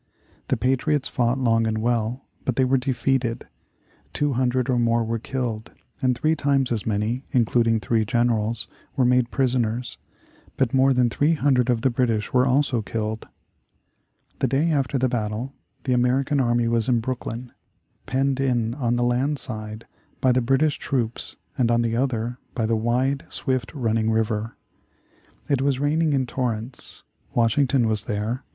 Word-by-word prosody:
The -, -, +1 dB
patriots 135 Hz, +2 st, +1 dB
fought 120 Hz, 0 st, 0 dB
long 115 Hz, -3 st, +2 dB
and 110 Hz, 0 st, -1 dB
well, 115 Hz, +2 st, -1 dB, 0.2 s
but 130 Hz, -, -1 dB
they 130 Hz, -, +3 dB
were 135 Hz, +1 st, +2 dB
defeated. 125 Hz, -2 st, -1 dB, 0.7 s
Two 145 Hz, -1 st, 0 dB
hundred 125 Hz, 0 st, +1 dB
or 125 Hz, -2 st, +1 dB
more 115 Hz, 0 st, +2 dB
were 115 Hz, 0 st, -2 dB
killed, 115 Hz, -3 st, -4 dB, 0.3 s
and 130 Hz, -2 st, +2 dB
three 155 Hz, +4 st, +2 dB
times 140 Hz, -3 st, +1 dB
as 110 Hz, -3 st, -2 dB
many, 110 Hz, +4 st, -1 dB
including 115 Hz, -2 st, +3 dB
three 110 Hz, 0 st, +1 dB
generals, 115 Hz, -1 st, 0 dB, 0.3 s
were 130 Hz, -, +3 dB
made 125 Hz, -1 st, +3 dB
prisoners. 125 Hz, -2 st, -1 dB, 0.6 s
But 130 Hz, -2 st, +1 dB
more 135 Hz, +1 st, +4 dB
than 125 Hz, -2 st, +2 dB
300 145 Hz, -4 st, +2 dB
of 120 Hz, -2 st, +2 dB
the 130 Hz, -, +2 dB
British 115 Hz, -3 st, 0 dB
were 125 Hz, +1 st, +4 dB
also 130 Hz, -2 st, +2 dB
killed. 110 Hz, 0 st, -4 dB, 1.1 s
The 135 Hz, -, +2 dB
day 140 Hz, +6 st, +1 dB
after 140 Hz, -2 st, 0 dB
the 130 Hz, 0 st, +2 dB
battle, 120 Hz, +2 st, -3 dB, 0.3 s
the 130 Hz, -, +1 dB
American 130 Hz, +4 st, +2 dB
army 120 Hz, -2 st, +2 dB
was 115 Hz, 0 st, +1 dB
in 120 Hz, -2 st, +3 dB
Brooklyn, 120 Hz, 0 st, -5 dB, 0.6 s
penned 135 Hz, 0 st, 0 dB
in 120 Hz, -4 st, +1 dB
on 120 Hz, -3 st, 0 dB
the 120 Hz, -, +1 dB
land 130 Hz, +5 st, +1 dB
side 110 Hz, -3 st, -5 dB, 0.3 s
by 130 Hz, -, +3 dB
the 125 Hz, +1 st, +2 dB
British 135 Hz, +5 st, +2 dB
troops 120 Hz, -4 st, -2 dB, 0.2 s
and 120 Hz, -2 st, +3 dB
on 120 Hz, 0 st, +3 dB
the 115 Hz, -1 st, 0 dB
other 120 Hz, -1 st, -1 dB, 0.2 s
by 115 Hz, -, 0 dB
the 115 Hz, +1 st, +1 dB
wide, 125 Hz, +5 st, 0 dB
swift 130 Hz, -3 st, -2 dB
running 115 Hz, -4 st, 0 dB
river. 110 Hz, 0 st, -1 dB, 0.9 s
It 140 Hz, -2 st, +1 dB
was 135 Hz, -1 st, +1 dB
raining 150 Hz, +2 st, +1 dB
in 135 Hz, -2 st, +1 dB
torrents. 120 Hz, -1 st, -4 dB, 0.3 s
Washington 120 Hz, +1 st, +3 dB
was 110 Hz, -2 st, -1 dB
there. 110 Hz, +5 st, -2 dB
125 Hz, 160 wpm, -24 LUFS, 115-130 Hz, 1.1 s, more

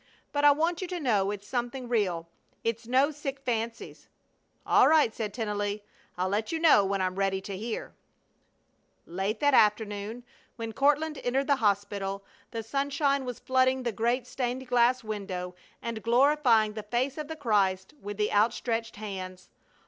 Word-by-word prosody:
"But 290 Hz, 0 st, -1 dB
I 290 Hz, -, +9 dB
want 325 Hz, +5 st, +1 dB
you 370 Hz, -, -3 dB
to 360 Hz, -1 st, -4 dB
know 210 Hz, -9 st, +1 dB
it's 205 Hz, 0 st, -5 dB
something 245 Hz, 0 st, -3 dB
real. 185 Hz, -8 st, 0 dB, 0.4 s
It's 230 Hz, 0 st, -2 dB
no 265 Hz, +4 st, +3 dB
sick 280 Hz, -2 st, -5 dB
fancies." 230 Hz, -1 st, -4 dB, 0.6 s
"All -, -, +5 dB
right!" 305 Hz, -8 st, +4 dB
said 215 Hz, -2 st, -3 dB
Tennelly. 205 Hz, -2 st, -3 dB, 0.3 s
"I'll 185 Hz, +1 st, 0 dB
let 210 Hz, -, -1 dB
you 325 Hz, -, 0 dB
know 320 Hz, -11 st, +6 dB
when 195 Hz, 0 st, 0 dB
I'm 185 Hz, 0 st, -2 dB
ready 195 Hz, -1 st, +1 dB
to 195 Hz, 0 st, -6 dB
hear." 220 Hz, +4 st, -5 dB, 1.1 s
Late 195 Hz, +5 st, -2 dB
that 285 Hz, -1 st, +4 dB
afternoon, 210 Hz, +1 st, +2 dB, 0.3 s
when 225 Hz, -1 st, -5 dB
Courtland 295 Hz, +3 st, +2 dB
entered 265 Hz, +3 st, +1 dB
the 280 Hz, -1 st, +2 dB
hospital, 200 Hz, -2 st, -1 dB, 0.3 s
the 225 Hz, -1 st, -5 dB
sunshine 280 Hz, +2 st, 0 dB
was 250 Hz, -2 st, -5 dB
flooding 260 Hz, 0 st, +2 dB
the 240 Hz, -, -1 dB
great 235 Hz, +3 st, 0 dB
stained 250 Hz, 0 st, -3 dB
glass 245 Hz, 0 st, +3 dB
window 195 Hz, -4 st, -4 dB, 0.3 s
and 230 Hz, -2 st, -4 dB
glorifying 240 Hz, -3 st, +3 dB
the 215 Hz, -, -5 dB
face 245 Hz, +7 st, -2 dB
of 300 Hz, -, -4 dB
the 320 Hz, -, -5 dB
Christ 200 Hz, -6 st, +1 dB
with 205 Hz, 0 st, -6 dB
the 210 Hz, 0 st, 0 dB
outstretched 225 Hz, +2 st, +1 dB
hands. 185 Hz, -3 st, -7 dB
230 Hz, 165 wpm, -28 LUFS, 205-265 Hz, 1.1 s, I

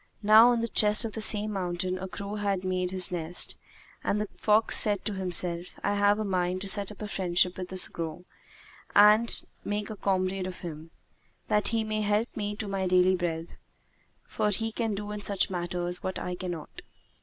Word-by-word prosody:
Now 215 Hz, +3 st, +7 dB
on 240 Hz, -1 st, +1 dB
the 230 Hz, -, -1 dB
crest 210 Hz, 0 st, +3 dB
of 225 Hz, -, -4 dB
the 220 Hz, -, -6 dB
same 215 Hz, 0 st, +4 dB
mountain 185 Hz, -1 st, -3 dB
a 190 Hz, -, -5 dB
crow 200 Hz, +2 st, -7 dB
had 200 Hz, -3 st, -2 dB
made 185 Hz, -1 st, -1 dB
his 185 Hz, -1 st, 0 dB
nest, 175 Hz, 0 st, +1 dB, 0.5 s
and 210 Hz, -, 0 dB
the 210 Hz, -, -2 dB
fox 215 Hz, +1 st, +3 dB
said 205 Hz, -2 st, +5 dB
to 210 Hz, -, -2 dB
himself, 180 Hz, -2 st, 0 dB
"I 205 Hz, -, 0 dB
have 205 Hz, 0 st, +2 dB
a 215 Hz, -, -3 dB
mind 185 Hz, -1 st, -1 dB
to 200 Hz, -, -5 dB
set 200 Hz, +1 st, 0 dB
up 210 Hz, -, -10 dB
a -, -, -4 dB
friendship 180 Hz, -2 st, 0 dB
with 185 Hz, -1 st, -7 dB
this 185 Hz, -1 st, +4 dB
crow 165 Hz, +1 st, -7 dB, 0.7 s
and 210 Hz, +3 st, +5 dB, 0.2 s
make 205 Hz, +1 st, -3 dB
a -, -, -6 dB
comrade 185 Hz, -1 st, -1 dB
of 185 Hz, -, -8 dB
him, 160 Hz, -2 st, -8 dB, 0.6 s
that 210 Hz, 0 st, +2 dB
he 225 Hz, -1 st, 0 dB
may 215 Hz, 0 st, -2 dB
help 210 Hz, +3 st, -1 dB
me 210 Hz, -1 st, -3 dB
to 215 Hz, 0 st, -6 dB
my 195 Hz, -1 st, -2 dB
daily 185 Hz, +1 st, +3 dB
bread; 170 Hz, -2 st, -4 dB, 0.7 s
for 210 Hz, -, -1 dB
he 225 Hz, +2 st, -2 dB
can 225 Hz, -2 st, -2 dB
do 205 Hz, +1 st, -6 dB
in 210 Hz, 0 st, -6 dB
such 200 Hz, -1 st, 0 dB
matters 175 Hz, 0 st, -3 dB
what 185 Hz, -, -4 dB
I 180 Hz, -, -4 dB
cannot." 175 Hz, -4 st, -7 dB
195 Hz, 200 wpm, -27 LUFS, 180-210 Hz, 0.7 s, Now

